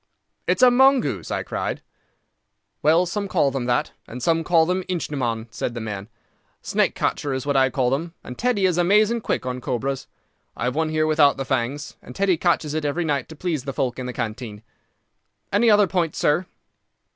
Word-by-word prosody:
"It's - - +2
a 250 - +8
mongoose," 265 +1 +3
I - - -2
cried. - - -4 1.0
"Well, 165 +4 +4
some 200 +3 -3
call 160 -7 +2
them 130 -2 -3
that, 120 0 0 0.2
and 125 +1 -8
some 165 -1 +2
call 165 0 +4
them 185 +2 -1
ichneumon," 130 -10 -2
said 120 +1 -4
the - - -3
man. 105 -2 -6 0.5
"Snake - - +1
catcher 140 -2 -1
is 130 - -4
what 145 -1 0
I 130 -1 +4
call 130 -2 0
them, 165 +5 -2
and 125 - -8
Teddy 235 - +1
is 180 -2 +2
amazing 210 +6 +3
quick - - -2
on 125 0 -3
cobras. 130 +2 -3 0.5
I - - -4
have 125 0 0
one 160 0 0
here 155 0 +1
without 155 -2 +4
the 135 - -3
fangs, 135 +3 -2
and - - -12
Teddy 195 -2 +2
catches 160 -3 +1
it 155 0 -2
every 150 +4 -1
night 140 -4 -1
to 160 - -9
please 155 -4 -2
the 135 - -4
folk 125 -1 -2
in 125 - -4
the - - -3
canteen. 110 -2 -5 0.9
"Any 235 - +4
other 210 -1 +6
point, 175 -4 -1
sir?" 170 +5 +1
150 Hz, 195 wpm, -23 LUFS, 130-175 Hz, 1.0 s, a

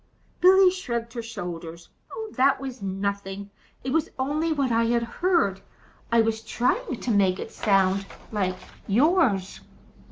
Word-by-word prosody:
Billy 370 +1 +7
shrugged 235 -11 -4
her 235 - -4
shoulders. 175 -7 -7 0.4
"That 270 +1 +3
was 265 -3 -7
nothing. 200 0 -4 0.3
It 260 - -3
was 320 -1 +1
only 295 +5 0
what 280 -5 0
I 230 0 +3
had 235 0 +1
heard. 235 - +1 0.5
I 230 0 +5
was 220 0 0
trying 245 +1 -1
to 245 - -2
make 195 -3 +3
it - - -7
sound 195 -1 +2 0.2
like 185 -4 -1 0.3
yours." 235 - +2
230 Hz, 135 wpm, -25 LUFS, 195-270 Hz, 0.5 s, Billy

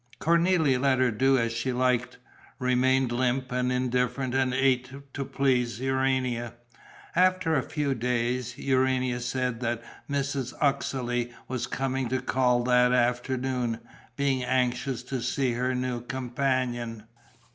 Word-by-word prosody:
Cornélie 170 -5 +3
let 135 -1 +3
her 130 -1 +3
do 135 +5 +3
as 115 -1 0
she 115 +3 -1
liked, 125 0 0 0.4
remained 130 0 +2
limp 130 +1 0
and 125 0 0
indifferent 125 0 0
and 130 -1 +2
ate 130 -1 +2 0.2
to 140 - -3
please 125 -4 0
Urania. 130 -3 0 0.6
After 185 -2 +3
a 135 - +3
few 145 0 -1
days, 125 0 -1
Urania 130 -2 +1
said 125 -1 -2
that 120 -1 -2 0.3
Mrs. 140 -2 -2
Uxeley 125 -4 0 0.2
was 130 -2 -3
coming 135 -2 -2
to 130 +1 0
call 125 -2 +2
that 125 0 +4
afternoon, 125 -1 0 0.4
being 135 -2 0
anxious 125 0 0
to 125 0 -4
see 125 +1 0
her 125 +2 -1
new 125 -1 -2
companion. 125 -3 -2
125 Hz, 130 wpm, -27 LUFS, 125-135 Hz, 0.6 s, that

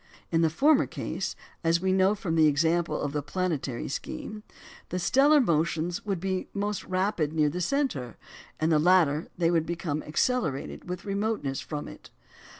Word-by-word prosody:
In 165 -1 +3
the 165 - +4
former 285 - +4
case - - -4 0.3
(as 165 +1 +3
we 190 +1 +1
know 190 +2 +3
from 200 -6 -3
the 160 -1 +6
example 165 +3 +1
of 145 - -2
the 150 - -1
planetary 150 -5 -2
scheme), 210 +8 -5 0.5
the 180 - -2
stellar 275 - +4
motions 170 - 0
would 195 -4 -2
be 190 0 -2
most 205 0 -2
rapid 185 -5 0
near 155 -2 +3
the 180 +5 -4
centre; 175 - -1 0.4
in 160 +1 +1
the 155 - +4
latter, 165 -3 +3
they 170 -1 +2
would 165 -2 +1
become 165 -3 -2
accelerated 160 - -1
with 180 +2 -5
remoteness 200 -9 -1
from 150 -2 -5
it. - - -12
170 Hz, 165 wpm, -27 LUFS, 155-195 Hz, 0.5 s, the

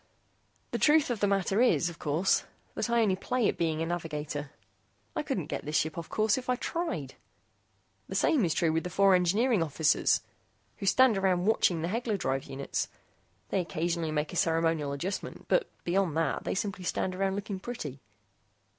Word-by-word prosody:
"The - - -2
truth 300 -3 +4
of 230 - -2
the 205 - +2
matter 195 +2 +1
is, 245 -8 +4
of 170 -1 -7
course, 160 +6 +1 0.3
that - - -2
I 235 -1 +3
only 195 -3 +2
play 245 +4 0
at - - 0
being 160 -1 0
a - - -1
navigator. 150 -4 -4 0.7
I - - 0
couldn't - - -2
get - - -4
this 150 +1 -4
ship 155 0 0
off 170 -1 -6
course, 215 +3 +2
if 255 - -10
I 250 - +3
tried. 175 - -3 1.0
The - - -5
same 285 -8 +3
is 165 -3 +1
true 165 -2 +2
with 160 +1 0
the 180 - -4
four 195 +2 +4
engineering 200 +5 +3
officers 155 -1 +2 0.6
who 195 - -4
stand 245 -1 +5
around 185 -2 +2
watching 180 -6 +2
the - - 0
Hegler 225 0 -1
drive 135 -6 -1
units. 135 0 -3 0.6
They - - +1
occasionally 170 -2 -1
make 150 +1 -2
a - - -3
ceremonial 165 -3 +1
adjustment, 175 +8 -5
but 480 - +2
beyond 175 -3 +1
that, 165 - 0
they - - -1
simply 195 -1 -3
stand 185 +1 -1
around 190 +1 0
looking 200 -1 -4
pretty." 155 - -6
180 Hz, 185 wpm, -29 LUFS, 160-205 Hz, 1.0 s, stand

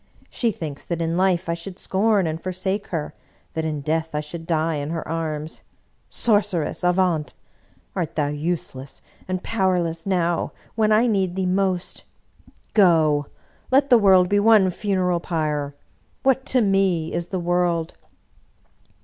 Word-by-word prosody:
She 235 -2 0
thinks 155 -7 -7
that 170 -1 -3
in 165 0 -1
life 185 -1 +1
I 170 - 0
should 175 +2 -7
scorn 200 0 +1
and 160 0 -3
for 185 - -3
sake 190 +2 -2
her, 160 -4 -4 0.4
that 160 0 -2
in 150 -2 -2
death 160 +2 -2
I - - +1
should 160 +2 -7
die 160 -1 0
in 145 +1 -4
her 165 0 -3
armsl 160 -1 -4 0.5
Sor 215 -4 +3
ceress, 180 -7 -3
avaunt! 180 -4 +1 0.6
Art 175 -5 -3
thou 145 -2 +1
useless 145 -3 -4 0.2
and 185 0 -3
powerless 180 -5 0
now 175 -3 0 0.2
when 215 -1 +2
I 215 +3 +5
need 190 -6 +1
thee 190 -1 -1
most? 185 -1 -1 0.7
Go! 160 -7 +4 0.4
Let 275 +1 +3
the 240 - +8
world 190 -3 +5
be 205 +2 +2
one 205 -3 +5
funeral 185 -3 0
pyre! 150 -4 -2 0.5
What 265 0 +2
to 255 - +3
me 195 -5 +1
is 170 0 -2
the 190 -1 -3
world 175 -1 0
175 Hz, 155 wpm, -23 LUFS, 160-195 Hz, 0.7 s, the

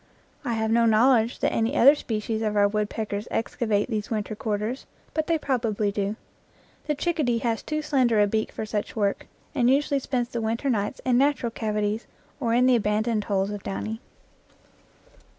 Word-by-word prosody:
I 245 -4 -1
have 220 0 0
no 230 0 +4
knowledge 230 +1 +4
that - - +1
any 230 +6 0
other 275 +4 +8
species 220 -5 -3
of 215 -1 -1
our 205 0 +5
woodpeckers 210 0 -3
excavate 220 -2 0
these 215 -3 -3
winter 215 -1 -2
quarters, 215 +4 -3 0.3
but 315 -1 -1
they 330 - +2
probably 225 -8 0
do. 200 +1 -2 0.7
The 300 - +1
chickadee 290 -6 0
has 230 -1 0
too 305 0 -3
slender 255 -7 +2
a 205 - +6
beak 215 +2 -1
for 220 - -5
such 210 -1 -3
work, 205 -3 -1 0.3
and 250 -5 +3
usually 280 +1 +2
spends 250 -2 -2
the 235 - -3
winter 230 +5 0
nights 205 -3 -2
in 250 -1 +3
natural 270 -4 +1
cavities 215 0 -2 0.3
or 235 -5 0
in 250 +1 +4
the 255 -1 +5
abandoned 215 0 0
holes 195 0 0
of 205 -1 -5
Downy. 220 +4 -4
225 Hz, 175 wpm, -25 LUFS, 210-250 Hz, 0.7 s, other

